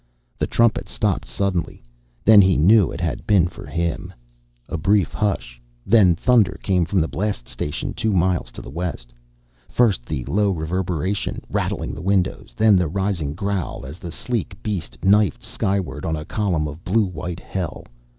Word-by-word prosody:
The - - 0
trumpet 115 -2 +2
stopped - - -1
suddenly. 85 +6 -2 0.4
Then 110 -1 +9
he 95 -1 +4
knew 95 +3 +5
it - - -6
had - - -3
been 100 -5 +5
for 85 - -10
him. 85 0 -2 0.6
A - - -4
brief 95 +2 +2
hush - - -2 0.2
then 95 -5 +5
thunder 105 -1 +3
came 90 -3 +2
from 95 +3 +1
the 80 - 0
blast 100 - -3
station 60 +4 -4
two 110 - -1
miles 90 -1 +1
to - - -9
the - - -9
west. 75 -7 -5 0.6
First 110 - +2
the 65 -5 -3
low 105 +1 +1
reverberation, 90 +2 -2
rattling - - -2
the - - -7
windows, 95 0 0
then 110 -3 +5
the 90 -2 +2
rising 85 -4 -2
growl 100 -6 -3
as 75 +6 -9
the 85 - -7
sleek 110 -4 -3
beast 100 -6 -4
knifed 105 0 +3
skyward 95 -7 -2
on 80 - -1
a 75 -1 -6
column 90 -6 0
of 75 +3 -9
blue 105 +3 +2
white 90 -1 -5
hell. 90 -5 -5
90 Hz, 170 wpm, -22 LUFS, 80-100 Hz, 0.6 s, Then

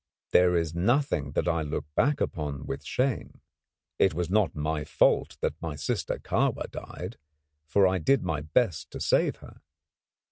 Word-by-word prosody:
There 90 -1 +5
is 80 -1 -1
nothing 90 - +1
that - - 0
I 85 -2 +1
look 75 -1 -3
back 145 - +2
upon 75 -3 -3
with 70 +2 -5
shame. 130 - -1 0.6
It 95 -5 +4
was 90 +1 -2
not 105 -5 +2
my 75 0 -1
fault 75 - +2
that 80 - -2
my 80 -3 -4
sister 70 - -2
Kahwa - - -1
died; - - -7 0.5
for 100 +5 +4
I 95 0 +2
did 135 - +2
my 75 -2 -1
best 80 +3 0
to - - -5
save - - +2
her. - - -15
85 Hz, 165 wpm, -28 LUFS, 75-95 Hz, 0.6 s, There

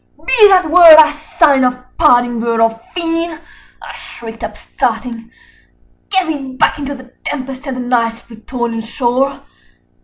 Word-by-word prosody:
"Be 435 -4 +5
that 370 -4 +3
word 340 -2 +9
our 305 -1 +6
sign 300 -2 +1
of 250 0 0 0.2
parting, 245 -6 +3
bird 230 0 -1
or 225 0 +1
fiend!" 330 -1 -3 0.4
I - - -10
shrieked, 225 -1 -11
upstarting: 230 +1 -4 0.8
"Get 380 -2 +1
thee 280 -5 -5
back 260 - +1
into 285 0 -5
the 260 -1 -15
tempest 270 0 -6
and 260 -2 -4
the - - -4
Night's 235 -2 -1
Plutonian 230 0 -6
shore! 250 +4 -2
260 Hz, 145 wpm, -14 LUFS, 235-310 Hz, 0.8 s, word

